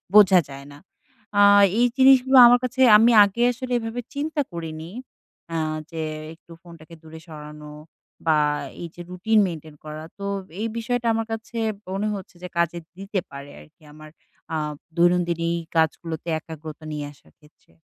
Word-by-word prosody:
বোঝা 195 -3 +8
যায় 140 0 -10
না। 145 - -13 0.6
আ - - +7 0.4
এই 245 - +5
জিনিসগুলো 265 0 +6
আমার 245 +1 +5
কাছে 255 +1 -2 0.2
আমি 230 +3 +5
আগে 220 +4 -2
আসলে 250 +1 -5
এভাবে 225 +2 -5
চিন্তা 300 +1 -2
করিনি। 165 -1 -7 0.6
আ - - 0 0.3
যে 165 -1 -5 0.3
একটু 170 +1 -21
ফোনটাকে 170 -1 -14
দূরে 160 0 -11
সরানো 150 -1 -10 0.6
বা 155 -1 +4 0.5
এই 170 - -5
যে 175 - -9
রুটিন 215 +5 +1
মেইনটেইন 160 -3 -8
করা। 155 0 -7 0.2
তো 200 - -5 0.4
এই 225 - -1
বিষয়টা 240 +1 -2
আমার 225 0 -1
কাছে 225 +1 -6 0.3
মনে 195 +3 -2
হচ্ছে 190 -2 -10
যে, - - -4
কাজে 170 0 0 0.2
দিতে 195 +1 -3
পারে 140 +1 -9
আরকি 75 - -21
আমার 155 0 -13 0.4
আ - - 0 0.4
দৈনন্দিন 175 -1 +2
এই 170 - -4 0.2
কাজগুলোতে 160 +1 -1
একাগ্রতা 155 -1 -10
নিয়ে 150 -1 -4
আসার 140 - -25
ক্ষেত্রে। 150 - -26
170 Hz, 160 wpm, -23 LUFS, 155-225 Hz, 0.6 s, বোঝা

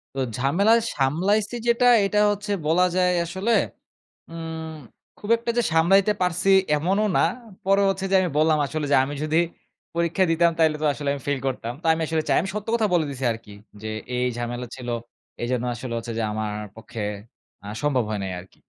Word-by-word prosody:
তো - - -3 0.2
ঝামেলায় 200 - +3
সামলাইসি 190 - +1
যেটা, 235 +1 +3 0.2
এইটা 210 +1 +1
হচ্ছে 205 0 -4 0.2
বলা 180 +3 +4
যায় 180 -1 +3
আসলে, 190 +7 -2 0.8
উম 160 -1 -6 0.4
খুব 205 - -9
একটা 235 0 -2
যে - - +5
সামলাইতে 195 +5 +4
পারসি 180 +2 +1 0.3
এমনও 195 +7 +1
না। - - +4 0.4
পরে 195 +1 +4
হচ্ছে 195 0 -2
যে - - +4
আমি 180 - 0
বললাম 155 0 +4
আসলে 155 +1 -3
যে, - - +6
"আমি 145 +2 -4
যদি 155 +2 +2 0.6
পরীক্ষা 170 +3 +1
দিতাম, 170 +1 +4
তাইলে 160 -1 +4
তো - - 0
আসলে 145 -1 -3
আমি 140 - -6
ফেইল 140 -2 0
করতাম।" 120 -2 -3
তো - - -14
আমি 165 - -3
আসলে 160 -1 0
চাই। - - +3
আমি 190 - -4
সত্য 210 +1 -5
কথা 220 -2 +2
বলে 165 -3 +3
দিসি 135 -1 -4
আরকি 110 -2 -8 0.3
যে, 110 - -5 0.3
"এই, 125 - 0
এই - - 0
ঝামেলা 120 +1 -4
ছিল, 125 -2 -7 0.5
এই 120 - -1
জন্য 125 -1 0
আসলে 120 +1 -6
হচ্ছে 115 0 -5
যে 115 - 0
আমার 105 -1 -3 0.2
পক্ষে 110 0 -8 0.6
আ - - -7
সম্ভব 135 -5 +1
হয় 105 - -2
নাই 95 - -3
আরকি। 90 +2 -16
160 Hz, 195 wpm, -24 LUFS, 130-195 Hz, 0.8 s, যে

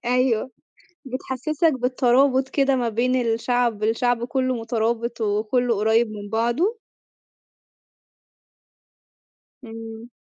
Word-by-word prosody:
أيوه، 250 0 +1 0.5
بتحسّسك 275 +5 -1
بالترابط 260 +1 +2
كده 275 -1 +2
ما 245 -2 0
بين 240 +3 0
الشعب، 235 -1 0
الشعب 235 +2 +1
كلّه 255 +1 -1
مترابط 230 0 -2
وكلّه 220 +3 +1
قريب 220 +2 +2
من 205 -1 -8
بعضه. 240 - 0 2.9
إمم. 225 0 -9
240 Hz, 90 wpm, -23 LUFS, 225-255 Hz, 2.9 s, بالترابط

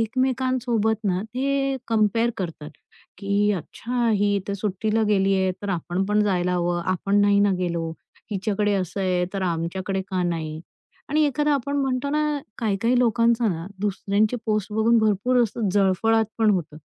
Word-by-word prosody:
एकमेकांसोबत 245 -2 0
ना 185 -2 0
ते 270 +4 -1
कंपेअर 225 +1 +2
करतात. 165 -5 -5 0.5
की, 200 +1 +1
अच्छा! 235 +6 -2
ही 205 -1 +2
तर - - -1
सुट्टीला 210 +2 -1
गेली 195 -1 +3
आहे, 190 -1 +1
तर 205 - -4
आपण 180 +1 -2
पण 210 0 +2
जायला 180 -3 +1
हवं. 175 -1 0
आपण 200 +3 +1
नाही 205 0 +4
ना 205 0 +4
गेलो. 170 -2 -2 0.4
हिच्याकडे 205 0 0
असं 190 0 -2
आहे, 180 -2 +1
तर 195 - -2
आमच्याकडे 180 +3 -2
का 185 -1 -1
नाही? 160 -3 -3 0.5
आणि 305 +2 +2
एखादा, 295 +1 +1
आपण 280 +1 -2
म्हणतो 265 0 -1
ना, 300 0 0 0.2
काही-काही 230 +3 +1
लोकांचा 235 -1 +3
ना 165 -3 -3
दुसऱ्यांचे 205 +3 0
पोस्ट 215 -1 -1
बघून 225 +2 +3
भरपूर 220 +4 +2
असा 225 -1 -1
जळफळाट 205 +3 +2
पण 220 -1 +4
होतो. 170 -6 -2
205 Hz, 155 wpm, -24 LUFS, 190-235 Hz, 0.5 s, नाही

